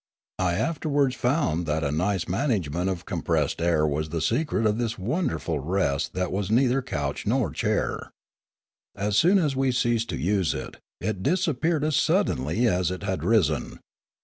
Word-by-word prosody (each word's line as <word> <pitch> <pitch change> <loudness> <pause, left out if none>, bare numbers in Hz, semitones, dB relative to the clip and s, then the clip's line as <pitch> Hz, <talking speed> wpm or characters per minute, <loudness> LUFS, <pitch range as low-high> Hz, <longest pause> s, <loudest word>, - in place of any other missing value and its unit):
I 90 -2 +1
afterwards 145 - 0
found 120 - 0
that 80 +1 0
a 70 - 0
nice 90 +4 0
nlanagement 95 - -1
of 90 -2 -5
compressed - - -1
air 85 -2 +2
was 75 +1 -1
the 85 +1 -2
secret 115 - 0
of 105 +1 +1
this 115 -2 -2
wonderful 95 - -1
rest 75 -2 -1
that 90 -1 -2
was 100 +1 -2
neither 125 +3 +3
couch 75 - -4
nor - - +1
chair. - - -1 0.8
As 100 +1 -1
soon 180 - +5
as 150 -7 +1
we 135 0 +2
ceased 120 -1 0
to - - -2
use 95 +4 +1
it, - - -7 0.2
it 95 +1 -3
disappeared 160 - +1
as 155 -2 +1
suddenly 75 - +1
as 90 -5 +2
it 95 +2 -5
had 95 -1 -2
risen. 85 -10 +1
100 Hz, 165 wpm, -25 LUFS, 85-130 Hz, 0.8 s, soon